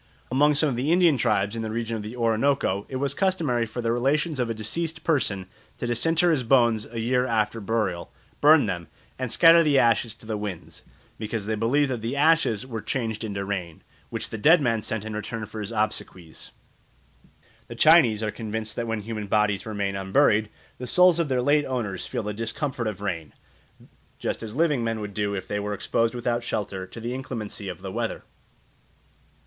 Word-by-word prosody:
Among 145 Hz, +3 st, +4 dB
some 150 Hz, +2 st, +5 dB
of 130 Hz, -, -2 dB
the 130 Hz, +6 st, 0 dB
Indian 175 Hz, -3 st, +5 dB
tribes 105 Hz, -4 st, +1 dB
in 115 Hz, -, -3 dB
the 110 Hz, -, -3 dB
region 115 Hz, +1 st, -3 dB
of 110 Hz, -, -4 dB
the 105 Hz, +3 st, -7 dB
Orinoco 115 Hz, -3 st, +1 dB
it 130 Hz, -, -6 dB
was 140 Hz, +1 st, 0 dB
customary 155 Hz, -, 0 dB
for 120 Hz, +2 st, -5 dB
the 115 Hz, -, +1 dB
relations 140 Hz, +5 st, 0 dB
of 120 Hz, -2 st, 0 dB
a -, -, 0 dB
deceased 160 Hz, +10 st, -3 dB
person 105 Hz, -, 0 dB, 0.3 s
to -, -, -4 dB
disinter 165 Hz, +9 st, +2 dB
his 150 Hz, -5 st, +2 dB
bones 115 Hz, -3 st, +3 dB
a 115 Hz, 0 st, -6 dB
year 125 Hz, +2 st, +1 dB
after 110 Hz, -1 st, 0 dB
burial, 100 Hz, -5 st, -2 dB, 0.3 s
burn 150 Hz, -1 st, +6 dB
them, 90 Hz, -5 st, -4 dB, 0.3 s
and 130 Hz, -3 st, -3 dB
scatter 165 Hz, 0 st, +7 dB
the 150 Hz, -4 st, +3 dB
ashes 115 Hz, -2 st, +2 dB
to 115 Hz, -, -15 dB
the 110 Hz, -1 st, -3 dB
winds, 100 Hz, -5 st, -7 dB, 0.4 s
because 110 Hz, -1 st, -4 dB
they 110 Hz, -, -1 dB
believed 130 Hz, +6 st, +1 dB
that 120 Hz, -3 st, -3 dB
the 115 Hz, +4 st, -3 dB
ashes 145 Hz, -7 st, +3 dB
were 115 Hz, -4 st, -5 dB
changed 115 Hz, -3 st, -3 dB
into 100 Hz, -2 st, -3 dB
rain, 90 Hz, -5 st, -5 dB, 0.3 s
which -, -, -4 dB
the 110 Hz, -, -5 dB
dead 160 Hz, +10 st, +6 dB
man 115 Hz, -6 st, 0 dB
sent 110 Hz, 0 st, -3 dB
in 110 Hz, -, -5 dB
return 110 Hz, +1 st, -4 dB
for 110 Hz, +1 st, -8 dB
his 105 Hz, +1 st, -5 dB
obsequies. 105 Hz, -6 st, -3 dB, 1.2 s
The -, -, -8 dB
Chinese 140 Hz, -10 st, +5 dB
are 105 Hz, -, -1 dB
convinced 110 Hz, 0 st, -5 dB
that 120 Hz, -, -2 dB
when 115 Hz, -1 st, -2 dB
human 105 Hz, -1 st, -5 dB
bodies 105 Hz, 0 st, +1 dB
remain 100 Hz, -2 st, -2 dB
unburied, 105 Hz, +2 st, +2 dB, 0.3 s
the 125 Hz, -, -5 dB
souls 180 Hz, +4 st, +5 dB
of 165 Hz, -, +1 dB
their 125 Hz, -2 st, +1 dB
late 145 Hz, +2 st, +3 dB
owners 115 Hz, -8 st, -3 dB
feel -, -, -3 dB
the 105 Hz, 0 st, -3 dB
discomfort 115 Hz, +3 st, -2 dB
of 105 Hz, -2 st, -5 dB
rain, 85 Hz, -7 st, -4 dB, 0.8 s
just -, -, -3 dB
as 110 Hz, 0 st, -7 dB
living 150 Hz, -5 st, +2 dB
men 115 Hz, -1 st, -1 dB
would 105 Hz, -1 st, -6 dB
do 105 Hz, 0 st, -1 dB
if 95 Hz, -, -5 dB
they 105 Hz, -, -2 dB
were 105 Hz, 0 st, -3 dB
exposed 115 Hz, +4 st, 0 dB
without 120 Hz, 0 st, -1 dB
shelter 95 Hz, -4 st, -3 dB
to 105 Hz, -, -10 dB
the 120 Hz, +2 st, -4 dB
inclemency 110 Hz, -6 st, -5 dB
of 90 Hz, 0 st, -8 dB
the 95 Hz, -, -5 dB
weather. -, -, -3 dB
115 Hz, 200 wpm, -25 LUFS, 105-130 Hz, 1.2 s, scatter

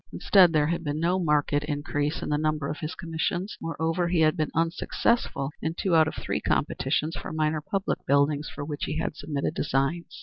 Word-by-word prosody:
Instead 185 Hz, -4 st, +5 dB
there 155 Hz, -2 st, +3 dB
had 170 Hz, +2 st, -1 dB
been 145 Hz, 0 st, -2 dB
no 175 Hz, +3 st, +1 dB
marked 150 Hz, -4 st, +1 dB
increase 145 Hz, 0 st, -1 dB
in -, -, -3 dB
the 150 Hz, -, +2 dB
number 155 Hz, -2 st, 0 dB
of 150 Hz, -, -4 dB
his 155 Hz, +2 st, -4 dB
commissions; 175 Hz, +3 st, -2 dB
moreover 165 Hz, +2 st, -1 dB
he 170 Hz, -1 st, +2 dB
had 155 Hz, -1 st, +4 dB
been 155 Hz, -2 st, -1 dB
unsuccessful 165 Hz, -, 0 dB
in 160 Hz, +1 st, -2 dB
two 180 Hz, -2 st, +1 dB
out 160 Hz, -1 st, +6 dB
of -, -, -4 dB
three -, -, -3 dB
competitions 155 Hz, +2 st, 0 dB
for -, -, -6 dB
minor 155 Hz, 0 st, 0 dB
public 195 Hz, +5 st, -2 dB
buildings 140 Hz, +2 st, +2 dB
for 145 Hz, -, -6 dB
which 145 Hz, -1 st, -3 dB
he 155 Hz, -, -3 dB
had -, -, -2 dB
submitted 145 Hz, 0 st, -3 dB
designs. 145 Hz, +3 st, -1 dB
155 Hz, 200 wpm, -27 LUFS, 150-165 Hz, -, out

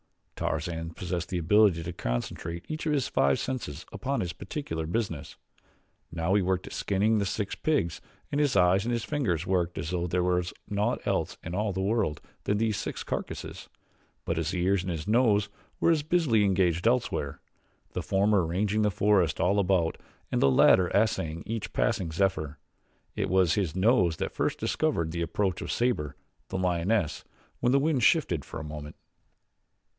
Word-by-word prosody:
Tarzan 80 Hz, +1 st, -3 dB
possessed 90 Hz, -1 st, -3 dB
the 90 Hz, -, -1 dB
ability 90 Hz, 0 st, +4 dB
to 85 Hz, +1 st, -5 dB
concentrate 80 Hz, +6 st, -4 dB
each 155 Hz, +1 st, -4 dB
of 150 Hz, -, +2 dB
his 140 Hz, -3 st, +1 dB
five 70 Hz, 0 st, +2 dB
senses 105 Hz, -, -4 dB
upon 130 Hz, +7 st, -2 dB
its 85 Hz, -, -4 dB
particular 90 Hz, -, -5 dB
business. 85 Hz, -6 st, -3 dB, 0.8 s
Now 85 Hz, +3 st, 0 dB
he 100 Hz, -, +4 dB
worked 95 Hz, 0 st, 0 dB
at -, -, -8 dB
skinning 105 Hz, +3 st, +1 dB
the 100 Hz, -, 0 dB
six 100 Hz, +1 st, -2 dB
pigs 140 Hz, -, 0 dB, 0.3 s
and 145 Hz, -, +1 dB
his 145 Hz, -6 st, +2 dB
eyes 90 Hz, +1 st, +4 dB
and 120 Hz, -, -1 dB
his 115 Hz, -1 st, -1 dB
fingers 95 Hz, -, -1 dB
worked 90 Hz, -2 st, 0 dB
as 75 Hz, -, -3 dB
though 90 Hz, -1 st, -1 dB
there 90 Hz, +1 st, 0 dB
was 90 Hz, 0 st, +1 dB, 0.2 s
naught 105 Hz, 0 st, -1 dB
else -, -, -1 dB
in 85 Hz, -, -6 dB
all 105 Hz, +2 st, 0 dB
the 95 Hz, 0 st, -2 dB
world 100 Hz, -8 st, 0 dB, 0.3 s
than 105 Hz, -, +1 dB
these 110 Hz, -2 st, +1 dB
six -, -, -4 dB
carcasses; -, -, -5 dB, 0.6 s
but 85 Hz, -, -1 dB
his 80 Hz, +3 st, -1 dB
ears 95 Hz, +2 st, +2 dB
and 90 Hz, -, -5 dB
his 80 Hz, 0 st, -4 dB
nose 105 Hz, -3 st, +3 dB, 0.3 s
were 170 Hz, -, +4 dB
as 160 Hz, -2 st, +2 dB
busily 150 Hz, -9 st, +2 dB
engaged 90 Hz, -1 st, +2 dB
elsewhere 115 Hz, -, 0 dB, 0.5 s
the -, -, -3 dB
former 100 Hz, 0 st, +2 dB
ranging 100 Hz, +6 st, 0 dB
the 105 Hz, -, +3 dB
forest 95 Hz, -5 st, +2 dB
all 100 Hz, +3 st, +3 dB
about 90 Hz, -4 st, +1 dB, 0.3 s
and -, -, +1 dB
the 70 Hz, -, +5 dB
latter 90 Hz, +7 st, +6 dB
assaying 85 Hz, -6 st, +1 dB
each 115 Hz, -1 st, -4 dB
passing 85 Hz, -4 st, 0 dB
zephyr. 80 Hz, -4 st, 0 dB, 0.6 s
It -, -, -1 dB
was 95 Hz, -3 st, +3 dB
his 90 Hz, -6 st, -1 dB
nose 95 Hz, -5 st, +3 dB
that -, -, -2 dB
first -, -, -1 dB
discovered 80 Hz, -1 st, 0 dB
the 85 Hz, +1 st, -3 dB
approach 90 Hz, +3 st, -1 dB
of -, -, -4 dB
Sabor, 115 Hz, -, 0 dB, 0.3 s
the -, -, -4 dB
lioness, 90 Hz, 0 st, 0 dB, 0.4 s
when 120 Hz, -, +2 dB
the 135 Hz, -, +5 dB
wind 145 Hz, -2 st, +1 dB
shifted -, -, +3 dB
for -, -, -7 dB
a -, -, -6 dB
moment. 75 Hz, -1 st, -7 dB
95 Hz, 180 wpm, -28 LUFS, 85-105 Hz, 0.8 s, latter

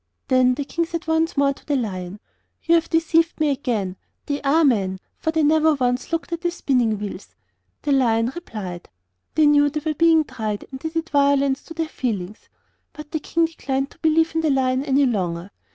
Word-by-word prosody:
Then 255 Hz, -1 st, +4 dB
the 285 Hz, -, -3 dB
King 335 Hz, +3 st, -2 dB
said 335 Hz, +1 st, -5 dB
once 320 Hz, 0 st, 0 dB
more 280 Hz, 0 st, +3 dB
to -, -, -20 dB
the 290 Hz, -, -1 dB
Lion: 195 Hz, -5 st, -4 dB, 0.4 s
'You 335 Hz, -, +2 dB
have 335 Hz, -1 st, +3 dB
deceived 330 Hz, 0 st, +2 dB
me 305 Hz, -2 st, +2 dB
again; 220 Hz, -9 st, -2 dB, 0.3 s
they 285 Hz, 0 st, -2 dB
are 305 Hz, +3 st, +3 dB
men, 195 Hz, -8 st, +1 dB, 0.2 s
for 320 Hz, -, -2 dB
they 320 Hz, -1 st, +1 dB
never 310 Hz, +1 st, +4 dB
once 250 Hz, 0 st, -1 dB
looked 335 Hz, +1 st, -2 dB
at 335 Hz, -, -3 dB
the 345 Hz, -, +1 dB
spinning 250 Hz, -10 st, 0 dB
wheels.' 205 Hz, -1 st, -7 dB, 0.5 s
The 295 Hz, -, 0 dB
Lion 235 Hz, -3 st, +2 dB
replied: 200 Hz, -, -7 dB, 0.5 s
'They 310 Hz, 0 st, +5 dB
knew 290 Hz, 0 st, +5 dB
they 305 Hz, +1 st, -4 dB
were 310 Hz, -, +1 dB
being 325 Hz, +1 st, +4 dB
tried, 215 Hz, -7 st, -4 dB
and 265 Hz, -, -7 dB
they 320 Hz, -, -4 dB
did 325 Hz, 0 st, -3 dB
violence 280 Hz, -1 st, +2 dB
to 325 Hz, -, -10 dB
their 325 Hz, 0 st, -1 dB
feelings.' 215 Hz, -9 st, -4 dB, 0.4 s
But 300 Hz, -1 st, -10 dB
the 315 Hz, -, -1 dB
King 335 Hz, +2 st, +1 dB
declined 275 Hz, -4 st, -3 dB
to -, -, -20 dB
believe 320 Hz, 0 st, +2 dB
in 325 Hz, -, +1 dB
the 315 Hz, -, +1 dB
Lion 260 Hz, -1 st, +1 dB
any 280 Hz, 0 st, +3 dB
longer. 185 Hz, -5 st, -2 dB
280 Hz, 200 wpm, -22 LUFS, 240-320 Hz, 0.5 s, They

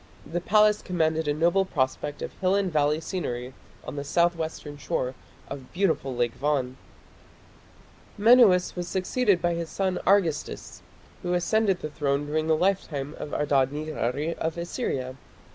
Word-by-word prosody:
The 175 Hz, +3 st, -3 dB
palace 210 Hz, +2 st, +4 dB
commanded 160 Hz, -3 st, 0 dB
a 145 Hz, -, +2 dB
noble 170 Hz, +5 st, +3 dB
prospect 145 Hz, -3 st, -2 dB
of -, -, -5 dB
hill 185 Hz, +1 st, +2 dB
and 195 Hz, -4 st, 0 dB
valley 150 Hz, 0 st, +2 dB
scenery 130 Hz, -8 st, -4 dB, 0.3 s
on -, -, -7 dB
the 140 Hz, -, -3 dB
south 170 Hz, +4 st, +2 dB
western 160 Hz, -2 st, -5 dB
shore 130 Hz, -2 st, -2 dB, 0.3 s
of 135 Hz, -2 st, -8 dB
beautiful 165 Hz, -8 st, 0 dB
Lake 120 Hz, -1 st, 0 dB
Van. 135 Hz, -3 st, -1 dB, 1.4 s
Menuas 215 Hz, -4 st, +5 dB
was 175 Hz, -1 st, -4 dB
succeeded 190 Hz, +2 st, +1 dB
by 175 Hz, 0 st, +2 dB
his 170 Hz, -1 st, -4 dB
son 190 Hz, -2 st, -1 dB
Argistis, 180 Hz, -6 st, +1 dB, 0.4 s
who 180 Hz, 0 st, -1 dB
ascended 195 Hz, +2 st, +1 dB
the 155 Hz, -, -4 dB
throne 145 Hz, -1 st, -1 dB
during 155 Hz, +2 st, -1 dB
the 160 Hz, -1 st, +3 dB
lifetime 155 Hz, -6 st, -1 dB
of 150 Hz, -, -6 dB
Adad 140 Hz, -3 st, +2 dB
nirari 150 Hz, 0 st, -2 dB
of 160 Hz, +1 st, -2 dB
Assyria. 135 Hz, -, -3 dB
160 Hz, 150 wpm, -26 LUFS, 145-185 Hz, 1.4 s, Menuas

